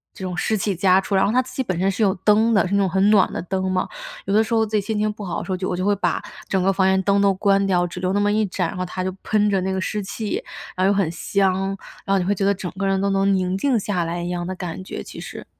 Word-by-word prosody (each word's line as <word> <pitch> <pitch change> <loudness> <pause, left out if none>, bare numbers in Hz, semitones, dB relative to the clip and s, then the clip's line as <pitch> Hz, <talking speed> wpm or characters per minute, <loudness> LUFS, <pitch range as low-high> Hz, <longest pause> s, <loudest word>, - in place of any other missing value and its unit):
这 190 - -6
种 180 -1 -4
湿 215 +4 0
气 200 0 -1
加 185 +1 +4
出。 195 - -4
然 - - +4
后 205 - +2
它 255 +2 +3
自 - - -12
己 - - 0
本 185 -9 -2
身 190 +2 +2
是 200 - -4
有 200 -3 +4
灯 220 +2 +4
的， 200 -4 +3
是 190 - -4
那 200 - +3
种 195 -1 +2
很 190 +3 +2
暖 200 -4 +4
的 - - -4
灯 190 0 -2
嘛， 185 - 0 0.4
有 195 - -1
的 220 +2 +5
时 225 - -8
候 225 -1 +3
自 215 - -4
己 210 - +3
心 215 +2 -3
情 215 0 +1
不 210 - -9
好 180 - -3
的 - - -4
时 - - -5
候， 185 - 0
就 185 0 -3
我 180 - -2
就 185 - -1
会 205 0 +3
把 175 -4 0 0.3
整 190 - +1
个 195 +1 +3
房 190 0 +2
间 190 0 +3
灯 200 +1 +3
都 200 -1 +4
关 195 +1 +2
掉， 180 -2 +2
只 175 +1 -6
留 185 +1 -1
那 205 - +2
么 205 0 +2
一 215 +1 +2
盏， 180 -2 -1
然 - - -6
后 185 - -2
它 185 +1 -4
就 185 - -1
喷 210 -1 +1
着 195 -2 +1
那 190 +1 -1
个 190 - -1
湿 210 +2 -2
气， 220 - -4 0.3
然 185 - 0
后 - - +4
又 - - +3
很 190 -5 +2
香， 195 +1 0 0.4
然 195 - 0
后 - - +3
你 185 - +1
会 195 +3 +1
觉 200 0 -2
得 200 - +4
整 185 -2 -5
个 195 - 0
人 195 0 +1
都 200 0 +1
能 195 0 +2
宁 185 0 0
静 245 +4 +1
下 190 -3 -1
来 170 +1 -3
一 175 - -3
样 175 -1 -3
的 185 - -4
感 180 0 -6
觉， - - -6
其 - - -10
实。 - - -8
195 Hz, 360 characters per minute, -22 LUFS, 185-205 Hz, 0.4 s, 的